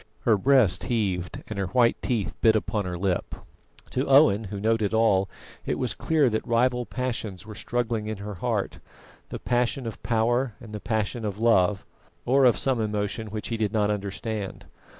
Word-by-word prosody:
Her 115 - +4
breast 110 -5 +3
heaved 95 -8 -2
and 105 -2 -5
her 95 - -1
white 120 +4 +3
teeth 115 -6 -1
bit 110 -1 +5
upon 105 -1 -1
her 90 -1 -4
lip. 90 0 -1 0.6
To 130 - -1
Owen, 115 -7 +5
who 100 0 -6
noted 110 0 +1
all, 100 -4 +3 0.3
it - - -2
was 125 -3 -1
clear 155 -4 +2
that 110 - -2
rival 125 +1 +1
passions 115 -7 -4
were 110 - -9
struggling 115 -1 -2
in 110 -1 -3
her 105 +1 -6
heart: 90 - -2 0.5
the - - -5
passion 125 +1 -1
of 115 - -6
power 120 +1 +1
and 110 -3 -11
the 105 - -4
passion 110 +2 -2
of 105 -2 -3
love, 105 -4 +3 0.4
or 135 +2 +4
of 120 - +5
some 130 -4 +1
emotion 105 +1 -2
which 105 0 -5
he 115 - -2
did 110 -3 -1
not 105 -1 +2
understand. 100 0 -4
110 Hz, 180 wpm, -26 LUFS, 100-120 Hz, 0.6 s, bit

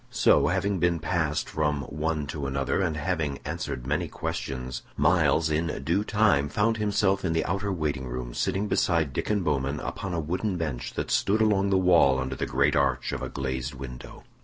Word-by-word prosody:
So, - - +4
having 95 +2 0
been 85 0 +2
passed 80 -1 -1
from 75 -2 -1
one 75 +1 -2
to 70 0 -4
another, 70 +6 0
and 80 -4 0
having 80 -4 -1
answered 60 - -4
many 75 +3 0
questions, 65 -2 -4 0.2
Myles 80 0 +3
in 80 +2 +1 0.2
due 85 +8 +1
time 105 -10 +2
found 110 +7 +1
himself 100 -2 +1
in 85 -3 0
the 80 - 0
outer 100 +2 -1
waiting 75 -7 -2
room - - -5
sitting 100 +2 -1
beside 80 -8 +1
Diccon 105 +5 0
Bowman 70 -2 0
upon 95 -3 -4
a - - 0
wooden 90 +5 -2
bench 75 -7 -4
that - - -3
stood 105 +3 +2
along 100 -3 +3
the 95 - +3
wall 85 -8 +5
under 65 0 -3
the - - -3
great - - +2
arch 70 -3 +1
of - - -4
a - - -4
glazed 65 0 -3
window. 65 -2 -9
80 Hz, 185 wpm, -27 LUFS, 70-95 Hz, 0.2 s, wall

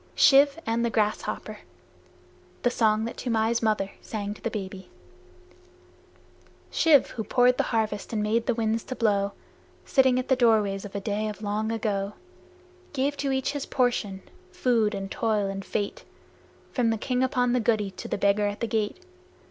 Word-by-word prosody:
Shiv 280 +1 +6
and 230 +1 0
the 235 - +1
Grasshopper 215 -1 -2 1.0
(The 245 - +3
song 220 -2 +2
that 235 - -6
Toomai's 230 -1 0
mother 215 -3 0
sang 205 -2 -4
to - - -16
the 230 - -1
baby) 190 -3 -6 1.8
Shiv, 310 -5 +4
who 220 - -4
poured 250 +2 +3
the - - +2
harvest 215 -3 -1
and 215 -2 -1
made 225 +2 0
the 245 - +2
winds 225 0 0
to 255 - -5
blow, 200 -3 +1 0.5
Sitting 260 -2 +4
at 255 - -2
the 260 - +4
doorways 215 -5 +2
of 200 - -10
a - - -1
day 210 +2 -2
of 210 0 -6
long 215 +2 -1
ago, 205 -3 -2 0.8
Gave 280 +1 0
to 275 -1 -1
each 265 +1 0
his 285 -1 -4
portion, 225 -7 0 0.3
food 240 - +1
and 195 0 -5
toil 215 -3 0
and 195 0 -4
fate, 205 +1 -3 0.7
From 245 -3 +1
the 225 - +1
King 250 +3 -1
upon 250 -2 +1
the 250 - +2
guddee 215 -3 +1
to - - -6
the - - -2
Beggar 200 +1 +2
at 205 0 -4
the - - -1
gate. 220 - -2
220 Hz, 170 wpm, -26 LUFS, 205-245 Hz, 1.8 s, Shiv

